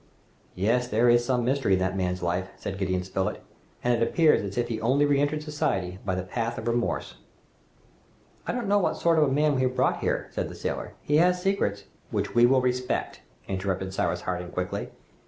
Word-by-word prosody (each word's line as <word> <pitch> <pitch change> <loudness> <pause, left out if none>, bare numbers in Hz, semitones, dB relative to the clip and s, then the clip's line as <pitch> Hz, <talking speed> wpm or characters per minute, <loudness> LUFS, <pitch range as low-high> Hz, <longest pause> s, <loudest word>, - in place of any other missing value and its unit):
"Yes! 115 +6 +1
there 120 +1 +3
is 120 0 +5
some 125 -1 0
mystery 130 -5 +2
in 95 - +3
that 95 0 0
man's 90 -1 -1
life," 90 +2 -1
said 95 -1 -5
Gideon 95 -1 0
Spilett, 95 0 -3 0.4
"and 125 - +3
it 115 - 0
appears 155 +6 +4
as 100 +1 -6
if 120 -1 +1
he 115 -2 -2
had - - -8
only 135 +5 +3
re 140 -1 +3
entered 150 +1 0
society 95 - -2
by 95 -2 -1
the 95 - -2
path 115 +5 -3
of 110 - -5
remorse." 120 0 -1 1.3
"I - - +1
don't 240 -3 -3
know 205 +1 +4
what 190 - 0
sort 165 -1 +3
of 150 - +5
a 135 - 0
man 150 +2 +3
we 130 - 0
have 130 0 0
brought - - +2
here," - - -1
said - - -3
the - - -9
sailor. - - -4
"He 150 - +2
has 180 +2 +4
secrets 180 - 0 0.2
" - - -35
"Which - - -2
we 120 0 +6
will 130 +1 +4
respect," 125 0 -1 0.3
interrupted 95 0 -2
Cyrus 90 -2 -1
Harding 90 -1 -3
quickly. 90 +1 -3
120 Hz, 215 wpm, -26 LUFS, 95-140 Hz, 1.3 s, we